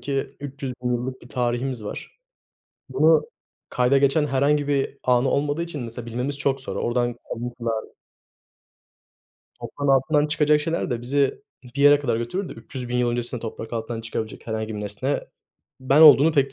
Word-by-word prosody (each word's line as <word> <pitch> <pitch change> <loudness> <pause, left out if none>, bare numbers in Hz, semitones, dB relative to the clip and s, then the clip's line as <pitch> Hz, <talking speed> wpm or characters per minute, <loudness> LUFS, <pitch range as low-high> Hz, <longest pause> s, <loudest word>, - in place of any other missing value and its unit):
ki 135 +2 -2
300.000 130 -3 -4
yıllık 130 +2 -3
bir - - -13
tarihimiz 120 -1 -2
var. 105 - -8 0.7
Bunu 155 +5 +4 0.5
kayda 125 +2 +3
geçen 140 +2 +3
herhangi 145 +2 +1
bir 140 -1 0
anı 125 +1 +3
olmadığı 145 +3 0
için 155 -6 -6
mesela 115 +1 -7
bilmemiz 125 +5 -3
çok 135 -1 0
zor. - - -6
Oradan 120 0 0 0.2
kalıntılar 115 -2 -3 1.8
Toprağın 145 -1 -4
altından 145 +3 +3
çıkacak 150 0 +3
şeyler 165 -2 -2
de 120 - -2
bizi 135 +3 0 0.2
bir 125 +3 -4
yere 145 0 +7
kadar 120 -6 -1
götürür 175 +12 -3
de - - -7
300.000 125 +1 -6
yıl 120 -1 +2
öncesinde 120 0 -3
toprak 110 0 -7
altından 115 0 -3
çıkabilecek 115 0 -6
herhangi 110 -1 -3
bir - - -5
nesne 105 +8 -2 0.6
ben 135 +3 +3
olduğunu 155 0 +8
pek 140 -3 +2
130 Hz, 155 wpm, -23 LUFS, 120-145 Hz, 1.8 s, olduğunu